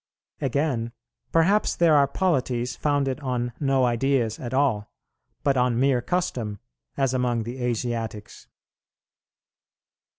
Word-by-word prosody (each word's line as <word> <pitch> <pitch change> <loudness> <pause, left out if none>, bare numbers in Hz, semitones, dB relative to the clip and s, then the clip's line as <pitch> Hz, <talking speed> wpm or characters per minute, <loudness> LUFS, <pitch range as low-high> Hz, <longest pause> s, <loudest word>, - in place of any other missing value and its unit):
Again, 130 -4 -1 0.4
perhaps 190 +6 +3
there 165 -3 +4
are 140 -1 +5
polities 130 -7 0
founded 140 -2 0
on 125 -3 -2
no 135 -2 +2
ideas 120 -2 +1
at 120 - -5
all, 130 -6 +1 0.5
but 140 -2 +2
on 125 -1 +2
mere 130 -2 +3
custom, 120 - -2 0.4
as 135 -2 +1
among 125 -3 0
the 120 +3 -6
Asiatics. 115 -3 -3
130 Hz, 110 wpm, -25 LUFS, 120-140 Hz, 0.5 s, are